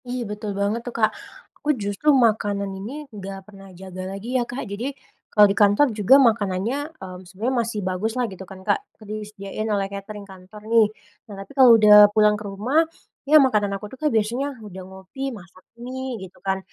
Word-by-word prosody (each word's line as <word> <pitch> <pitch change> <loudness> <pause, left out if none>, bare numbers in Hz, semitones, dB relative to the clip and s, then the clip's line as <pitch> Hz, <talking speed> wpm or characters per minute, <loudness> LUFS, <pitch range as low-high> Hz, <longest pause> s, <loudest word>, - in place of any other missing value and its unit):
Iya 250 0 -3
betul 210 0 -5
banget 205 +3 -1
tuh, 245 - -6
Kak. 215 -1 +3 0.5
Aku 295 - -4
justru 205 +7 -1
makanan 210 -6 +2
ini 275 +10 -7 0.2
gak 195 0 -8
pernah 195 -1 -14
jaga 185 -1 -8
lagi 200 +6 -6
ya, 255 -2 +2
Kak. 250 +3 -5
Jadi, 240 +8 -5 0.3
kalau 210 -1 +7
di - - -2
kantor 205 +8 +5
juga 215 +5 +5
makanannya, 220 -2 +1 0.2
mmm, 185 -1 -9
sebenarnya 220 +8 -2
masih 225 -2 -4
baguslah 220 +7 -1
gitu 190 - -12
kan, 190 - -10
Kak, 415 - +2 0.2
sering 215 0 -7
disediain 210 +1 -6
oleh 200 -2 0
katering 200 +1 -8
kantor 190 +2 -14
nih. 225 -1 +5 0.4
Nah - - -8
tapi 195 - -10
kalau 260 -3 +7
udah 210 -1 +8
pulang 210 0 +4
ke 210 - -8
rumah, 245 +11 +1 0.5
ya 310 - +8
makanan 210 -6 +1
aku 210 - -10
tuh, - - -10
Kak, 305 - +2
biasanya 245 +5 -1
udah 190 -2 -9
ngopi, 190 +9 -7
masak 180 0 -16 0.2
mie 255 0 -5
gitu 190 -1 -11
kan, 190 -1 -1
210 Hz, 190 wpm, -23 LUFS, 195-245 Hz, 0.5 s, udah